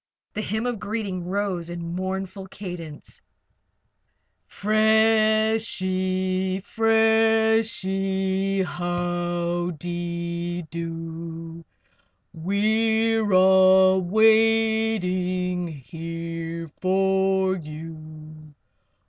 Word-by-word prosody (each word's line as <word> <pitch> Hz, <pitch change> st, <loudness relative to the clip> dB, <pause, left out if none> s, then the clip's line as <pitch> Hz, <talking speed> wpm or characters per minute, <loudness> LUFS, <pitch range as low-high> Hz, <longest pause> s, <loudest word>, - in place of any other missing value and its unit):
The 215 Hz, -, -3 dB
hymn 220 Hz, +2 st, -3 dB
of 245 Hz, -3 st, -2 dB
greeting 200 Hz, -5 st, -4 dB
rose 185 Hz, -3 st, -2 dB
in 170 Hz, -1 st, -5 dB
mournful 190 Hz, +1 st, -4 dB
cadence: 175 Hz, -6 st, -9 dB, 1.3 s
"Freshie! 215 Hz, -4 st, +1 dB
Freshie! 220 Hz, -4 st, +1 dB
How 175 Hz, 0 st, -2 dB
de 175 Hz, 0 st, -4 dB
do! 165 Hz, 0 st, -6 dB, 0.7 s
We're 220 Hz, +4 st, +1 dB
all 190 Hz, 0 st, +6 dB
waiting 215 Hz, -4 st, +2 dB
here 165 Hz, +2 st, -6 dB
for 190 Hz, 0 st, +2 dB
you. 155 Hz, -1 st, -10 dB
185 Hz, 60 wpm, -24 LUFS, 170-215 Hz, 1.3 s, all